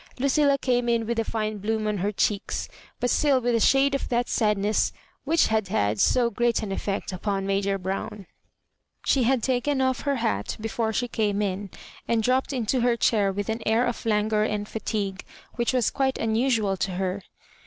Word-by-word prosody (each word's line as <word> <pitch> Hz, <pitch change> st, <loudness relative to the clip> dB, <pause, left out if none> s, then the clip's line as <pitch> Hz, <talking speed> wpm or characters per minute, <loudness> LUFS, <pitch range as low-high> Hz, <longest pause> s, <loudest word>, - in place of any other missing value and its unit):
Lucilla 280 Hz, +2 st, +3 dB
came 245 Hz, -2 st, 0 dB
in 230 Hz, -1 st, +1 dB
with 235 Hz, +1 st, -1 dB
a -, -, +2 dB
flne 215 Hz, -2 st, -3 dB
bloom 220 Hz, +1 st, -1 dB
on 210 Hz, -2 st, -1 dB
her 200 Hz, +3 st, 0 dB
cheeks, 205 Hz, 0 st, -1 dB, 0.3 s
but 245 Hz, 0 st, 0 dB
still 280 Hz, -3 st, +3 dB
with 245 Hz, -1 st, 0 dB
a 230 Hz, -, +3 dB
shade 270 Hz, +5 st, +4 dB
of 275 Hz, -, -2 dB
that 240 Hz, 0 st, 0 dB
sadness 210 Hz, -1 st, +1 dB, 0.3 s
which 325 Hz, +3 st, +3 dB
had 220 Hz, -2 st, 0 dB
had 105 Hz, -, 0 dB
so 240 Hz, -, +3 dB
great 235 Hz, +1 st, +1 dB
an 205 Hz, -, -4 dB
effect 195 Hz, 0 st, -3 dB
upon 195 Hz, +1 st, -2 dB
Major 195 Hz, 0 st, 0 dB
Brown. 195 Hz, +2 st, -5 dB, 0.8 s
She 260 Hz, -4 st, +3 dB
had 255 Hz, -2 st, +2 dB
taken 265 Hz, +2 st, 0 dB
off 260 Hz, -1 st, +1 dB
her 280 Hz, -1 st, -1 dB
hat 230 Hz, -3 st, -2 dB
before 225 Hz, +1 st, -2 dB
she 245 Hz, +3 st, -1 dB
came 210 Hz, -3 st, -1 dB
in, 200 Hz, -1 st, -2 dB, 0.4 s
and 230 Hz, -1 st, +1 dB
dropped 255 Hz, +4 st, +1 dB
into 250 Hz, -1 st, 0 dB
her 240 Hz, -1 st, +2 dB
chair 205 Hz, -4 st, +2 dB
with 205 Hz, +1 st, -4 dB
an 225 Hz, +1 st, -2 dB
air 225 Hz, +3 st, +2 dB
of 240 Hz, -, -3 dB
languor 215 Hz, -1 st, +1 dB
and 210 Hz, -1 st, -1 dB
fatigue 200 Hz, -3 st, -3 dB, 0.3 s
which 235 Hz, -1 st, 0 dB
was 250 Hz, -4 st, +1 dB
quite 265 Hz, -1 st, 0 dB
unusual 225 Hz, -3 st, +1 dB
to 190 Hz, 0 st, -2 dB
her. 190 Hz, +2 st, -2 dB
220 Hz, 190 wpm, -25 LUFS, 205-245 Hz, 0.8 s, shade